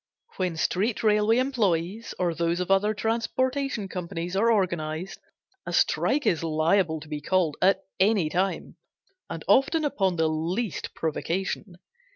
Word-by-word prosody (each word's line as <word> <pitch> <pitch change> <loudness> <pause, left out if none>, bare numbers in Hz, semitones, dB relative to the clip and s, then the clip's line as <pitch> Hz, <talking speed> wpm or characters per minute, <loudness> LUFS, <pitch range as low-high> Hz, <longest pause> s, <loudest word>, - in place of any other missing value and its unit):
When 180 -3 -1
street 205 +8 0
railway 210 +1 +3
employees, 220 -5 0
or 175 -2 0
those 170 +1 0
of 180 +1 -2
other 200 +2 +3
transportation 235 +1 -1
companies 180 -1 -5
are 225 +4 +3
organized, 175 -4 -1 0.5
a - - -3
strike 295 +1 +2
is 165 -2 +1
liable 160 +1 +1
to 155 - -11
be 150 -1 -5
called 170 -2 +1
at 190 +1 +3 0.2
any 195 -3 +3
time, 185 +5 -2 0.5
and 165 -1 -6
often 275 - +3
upon 195 -11 0
the 160 -1 +2
least 165 +7 -3
provocation. 175 +4 -3
190 Hz, 140 wpm, -26 LUFS, 165-220 Hz, 0.5 s, railway